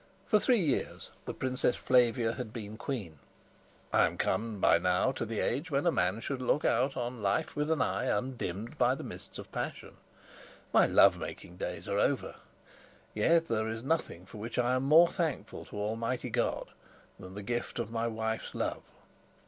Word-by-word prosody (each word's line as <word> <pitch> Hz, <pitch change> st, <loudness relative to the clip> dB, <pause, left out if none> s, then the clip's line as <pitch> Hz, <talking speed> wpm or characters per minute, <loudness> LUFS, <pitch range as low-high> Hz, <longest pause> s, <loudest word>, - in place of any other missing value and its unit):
For 210 Hz, -, +4 dB
three 245 Hz, +1 st, +3 dB
years 150 Hz, -8 st, -1 dB
the -, -, -4 dB
Princess 130 Hz, -1 st, 0 dB
Flavia 120 Hz, -2 st, +3 dB
had 120 Hz, -4 st, -6 dB
been 110 Hz, -2 st, -7 dB
queen. 105 Hz, -, -5 dB, 0.7 s
I -, -, +5 dB
am -, -, -6 dB
come 110 Hz, -2 st, -1 dB
by -, -, +5 dB
now 90 Hz, +8 st, +2 dB
to 130 Hz, -, -4 dB
the 110 Hz, -1 st, -2 dB
age 160 Hz, +5 st, -1 dB
when 140 Hz, +1 st, 0 dB
a 170 Hz, -, +5 dB
man 95 Hz, -, 0 dB
should 135 Hz, 0 st, -3 dB
look 135 Hz, +4 st, +1 dB
out 135 Hz, +2 st, +2 dB
on 120 Hz, -1 st, -3 dB
life 100 Hz, -1 st, 0 dB
with 150 Hz, +1 st, -1 dB
an 160 Hz, -5 st, +2 dB
eye 125 Hz, -, -1 dB
undimmed 120 Hz, -, -3 dB
by 125 Hz, +1 st, +4 dB
the -, -, -7 dB
mists -, -, -9 dB
of -, -, -9 dB
passion. -, -, -5 dB, 0.8 s
My -, -, +6 dB
love -, -, +6 dB
making 90 Hz, -, -7 dB
days -, -, -5 dB
are -, -, 0 dB
over; -, -, 0 dB, 0.8 s
yet 165 Hz, +10 st, +3 dB
there 110 Hz, -1 st, 0 dB
is 110 Hz, +1 st, -4 dB
nothing 135 Hz, -, -1 dB
for 105 Hz, -, -11 dB
which 115 Hz, +3 st, -5 dB
I 125 Hz, 0 st, +2 dB
am 130 Hz, -, +1 dB
more 160 Hz, +5 st, +7 dB
thankful 165 Hz, -5 st, -3 dB
to -, -, -12 dB
Almighty 115 Hz, +4 st, -2 dB
God 120 Hz, +1 st, -1 dB, 0.5 s
than 95 Hz, +1 st, -10 dB
the 105 Hz, -, -6 dB
gift 120 Hz, +3 st, -3 dB
of 115 Hz, -2 st, -3 dB
my 115 Hz, 0 st, -1 dB
wife's 110 Hz, 0 st, -3 dB
love. -, -, -2 dB
120 Hz, 185 wpm, -31 LUFS, 110-135 Hz, 0.8 s, more